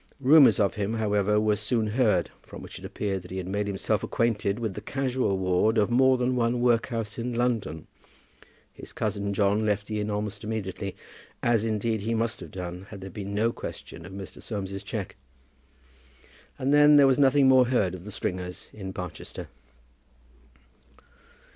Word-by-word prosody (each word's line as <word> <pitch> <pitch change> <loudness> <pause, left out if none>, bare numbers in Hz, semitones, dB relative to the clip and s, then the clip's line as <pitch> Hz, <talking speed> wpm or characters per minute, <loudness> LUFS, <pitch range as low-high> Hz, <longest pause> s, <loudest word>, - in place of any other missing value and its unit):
Rumours 140 -1 +6
of 100 -3 +2
him, 105 +1 -2
however, 105 -1 +2
were 105 0 +2
soon 115 +2 -1
heard, 105 -5 +1
from - - -11
which - - -9
it - - -10
appeared 95 -2 -3
that 90 - -13
he 95 - -5
had 95 - -3
made 100 +2 -2
himself 100 -1 -1
acquainted 105 -3 0
with 110 -4 -3
the - - -7
casual 130 -7 -1
ward 95 +4 +2
of 105 +1 +2
more 130 +1 +5
than 125 +1 0
one 120 0 +1
workhouse 115 -2 0
in 120 +1 -3
London. 115 -11 -1 0.9
His - - -12
cousin 100 -1 -2
John 100 +1 +2
left 105 -1 0
the 105 0 -3
inn 105 0 -2
almost 105 -1 -3
immediately, 100 -3 -4 0.5
as, 115 -2 +3
indeed, 110 0 -1
he 115 +3 -1
must 115 +2 -1
have - - -9
done 90 +1 -7
had 100 -3 -9
there 95 0 -8
been 100 -1 -6
no 115 +3 +2
question 85 - -8
of - - -11
Mr. 95 0 -9
Soames's 100 -3 -5
cheque, 100 -1 -5 1.4
and 135 +2 0
then 145 0 +7
there 145 -1 +7
was 135 0 +3
nothing 140 0 +5
more 130 -1 +6
heard 105 -8 +1
of 90 -2 -8
the 105 - -9
Stringers 90 -2 -5
in 95 -3 -7
Barchester. 90 -3 -7
105 Hz, 175 wpm, -27 LUFS, 100-120 Hz, 1.4 s, then